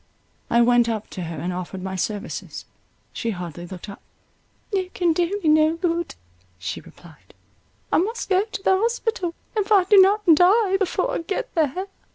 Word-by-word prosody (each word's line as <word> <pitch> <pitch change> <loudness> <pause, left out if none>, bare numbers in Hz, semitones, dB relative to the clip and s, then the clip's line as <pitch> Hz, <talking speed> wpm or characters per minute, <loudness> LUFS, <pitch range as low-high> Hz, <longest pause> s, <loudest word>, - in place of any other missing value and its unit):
I 235 0 +4
went 240 -1 +4
up 220 -2 -4
to 180 -3 -5
her 165 -1 -6
and 175 +5 -3
offered 185 +1 -6
my 190 0 -4
services. 205 +3 -4 0.5
She 230 - -3
hardly 175 -4 -6
looked 180 +1 -9
up—"You 370 - -8
can 345 -2 +2
do 355 +4 0
me - - 0
no 310 +1 +4
good," 340 -1 -2 0.4
she 90 - -5
replied; 160 -4 -18 0.6
"I - - +4
must 445 +7 -2
go 380 0 +3
to 425 -3 -7
the 380 - +4
hospital; 450 -5 -1 0.2
if 420 -1 -1
I 395 -3 +6
do 400 +2 +6
not 410 +3 +3
die 385 +4 +4
before 395 +5 -1
I - - -1
get 355 +4 -4
there." 320 +3 0
335 Hz, 175 wpm, -23 LUFS, -, 0.6 s, I